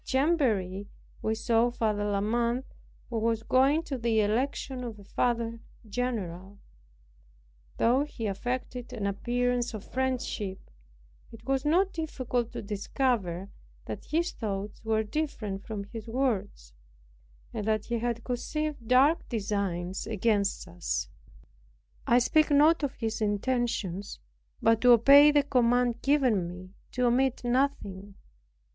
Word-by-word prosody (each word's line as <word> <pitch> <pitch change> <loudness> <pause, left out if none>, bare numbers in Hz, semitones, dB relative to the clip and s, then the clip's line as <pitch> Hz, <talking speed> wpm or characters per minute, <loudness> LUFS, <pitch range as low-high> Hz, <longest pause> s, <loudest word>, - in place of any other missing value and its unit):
At - - -28
Chamberry 230 - +1 0.3
we 220 - 0
saw 230 +1 +2
Father 215 -3 -1
La 200 -1 0
Mothe, 235 +4 0 0.5
who 230 - 0
was 225 0 0
going 270 +7 +3
to 275 -5 -4
the 225 -2 +2
election 255 +4 -1
of 230 -3 -6
a 200 - -13
Father 230 +2 -1 0.3
general. 200 -5 -4 1.2
Though 255 +5 +3
he 250 -6 -6
affected 245 +4 -4
an 205 - -3
appearance 245 +3 0
of 210 - -7
friendship, 245 - -3 0.6
it 225 0 -13
was 270 +1 0
not 365 +6 +3
difficult 255 -7 -2
to - - -5
discover 200 -3 -1 0.3
that - - -6
his 340 +3 0
thoughts 205 -1 -5
were 220 -1 +1
different 215 -6 -3
from 210 -3 -4
his 215 +2 -9
words, 215 - -2 0.8
and 210 - -4
that 215 -1 +1
he 235 -1 -2
conceived 245 +4 -3
dark 275 +7 +4
designs 195 -5 -2
against 205 -3 0
us. 175 0 -3 1.0
I 240 - +5
speak 305 +6 +3
not 300 +3 +5
of 285 -3 -2
his 225 -1 -3
intentions, 205 -3 -1 0.4
but 225 -1 +4
to 245 -1 +8
obey 280 +6 +8
the 290 -1 +4
command 245 -2 +2
given 255 -11 +2
me 180 +1 -9 0.2
to 250 0 +1
omit 250 +1 +2
nothing. 210 -7 -1
235 Hz, 130 wpm, -28 LUFS, 205-260 Hz, 1.2 s, to